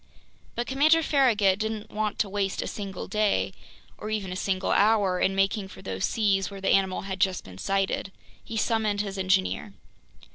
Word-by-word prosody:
But 240 - -1
Commander 310 +5 +4
Farragut 220 -10 +3
didn't 220 0 -3
want 215 -1 -2
to 210 - +1
waste 195 -1 -1
a - - -5
single 195 -3 -6
day, 200 - +1 0.5
or 215 - -5
even 205 -4 -2
a - - -4
single 190 0 -1
hour, 200 -3 +3
in 195 - +1
making 195 +1 +1
for - - -13
those 95 0 -2
seas 200 -3 +1
where 200 -1 -8
the 195 - -1
animal 190 -1 +2
had 190 -1 -5
just 190 -1 +1
been 95 0 -12
sighted. 195 - -1 0.3
He 225 - -6
summoned 215 -2 +1
his 195 -2 -5
engineer. 190 +2 0
200 Hz, 180 wpm, -26 LUFS, 190-215 Hz, 0.5 s, Commander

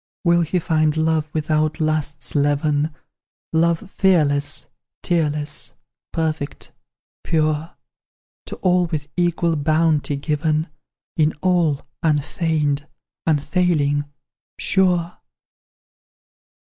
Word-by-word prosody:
"Will 170 -1 +4
he 170 +2 0
find 155 -2 +1
love 160 -1 +1
without 155 0 0
lust's 155 -2 -1
leaven, 145 +1 +1 0.6
Love 165 +1 +2
fearless, 145 -5 +2 0.4
tearless, 150 -3 -1 0.4
perfect, 155 -3 -3 0.5
pure, 155 0 0 0.7
To - - -5
all 180 -1 +3
with 150 -3 -4
equal 170 -1 +1
bounty 155 -1 +2
given; 155 +2 0 0.5
In 155 -1 +3
all, 170 -6 +2 0.2
unfeigned, 150 -1 0 0.4
unfailing, 150 -2 +1 0.5
sure? 180 -3 +1
155 Hz, 85 wpm, -21 LUFS, 150-170 Hz, 0.7 s, Will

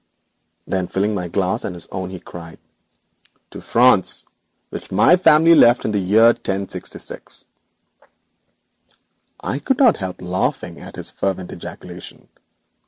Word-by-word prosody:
Then 95 -1 -2
filling 100 +4 -1
my 90 -4 -3
glass 95 +5 -1
and 90 - -4
his 85 - -8
own 95 -1 -4
he 95 -1 -8
cried: 80 -2 -11 0.9
'To - - -9
France, 120 -6 +3 0.4
which - - -8
my - - +5
family 165 -2 +5
left 120 -6 +5
in - - 0
the 105 - 0
year 105 +5 +5
1066!' 100 -5 -6 2.0
I 135 - -3
could 245 - 0
not 255 -5 +5
help 95 -2 -5
laughing 90 +1 -2
at - - -11
his - - -5
fervent 95 -2 -3
ejaculation. - - -10
100 Hz, 130 wpm, -20 LUFS, 90-120 Hz, 2.0 s, my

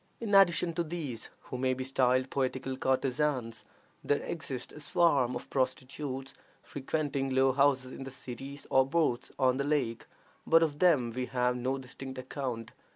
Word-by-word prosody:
In 220 -3 -3
addition 175 -3 +5
to 170 - 0
these, 155 -8 -5
who 125 - -6
may 130 0 +1
be 130 - -4
styled 130 0 +2
poetical 130 0 -1
courtesans, 130 -2 0 0.4
there 145 - +2
exists 135 -7 -5
a - - -10
swarm 145 -5 +2
of 120 - -6
prostitutes 135 +1 -2 0.3
frequenting 140 -1 -2
low 130 0 +4
houses 135 -1 +2
in - - -8
the 135 - -6
cities 135 +2 -8
or 130 - +6
boats 135 -3 0
on 130 -1 +3
the 140 - 0
lake; 140 -6 -1 0.4
but 165 0 +6
of 150 -2 -1
them 145 -10 +4
we 125 +2 -3
have 125 -1 +1
no 130 +2 -1
distinct 130 0 -8
account. 130 -3 -4
135 Hz, 160 wpm, -31 LUFS, 130-145 Hz, 0.4 s, or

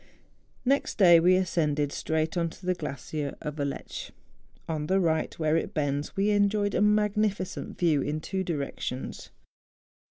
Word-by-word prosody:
Next 275 +3 +1
day 175 -4 +8
we 180 +2 +5
ascended 150 -6 +1
straight 160 +2 -1
on 170 -1 0
to 180 - -13
the 185 - +2
glacier 150 -2 -5
of 150 -1 -5
Aletsch. 140 -1 -4 0.6
On 155 -2 -2
the 190 +3 +3
right 160 -3 0
where 155 -1 +1
it 165 - -2
bends 145 -1 -1
we 200 +2 +2
en¬ 205 -1 +4
joyed 205 -1 0
a - - +1
magnificent 210 -2 +1
view 160 -5 +2
in 150 +3 -2
two 190 +4 -3
directions. 140 -5 -4
165 Hz, 155 wpm, -28 LUFS, 150-195 Hz, 0.6 s, day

